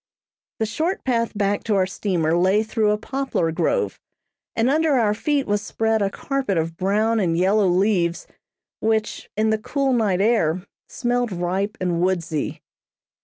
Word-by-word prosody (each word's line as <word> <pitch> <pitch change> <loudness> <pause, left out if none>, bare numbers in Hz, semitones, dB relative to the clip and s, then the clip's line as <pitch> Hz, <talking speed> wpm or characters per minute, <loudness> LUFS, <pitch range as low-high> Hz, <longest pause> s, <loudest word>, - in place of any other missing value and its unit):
The 220 - 0
short 315 - -2
path 230 -4 0
back 205 0 0
to 215 - +1
our 190 -1 +3
steamer 175 -4 0
lay 190 +5 +3
through 220 -1 0
a 210 - +2
poplar 265 -8 -2
grove, 465 - 0 0.6
and 225 +1 +2
under 310 +2 +2
our 225 -5 +3
feet 280 +6 0
was 205 0 0
spread 220 +1 0
a 200 - +2
carpet 265 -3 -2
of 165 0 -1
brown 215 +5 +1
and 170 -4 +1
yellow 195 +3 +3
leaves, 180 -2 +1 0.5
which, 220 0 -1
in 220 0 +2
the 220 - +1
cool 275 +4 0
night 210 -6 +1
air, 195 -5 +2 0.2
smelled 245 -1 -1
ripe 190 +4 -2
and 175 -2 0
woodsy. 170 -5 -1
210 Hz, 160 wpm, -22 LUFS, 185-230 Hz, 0.6 s, our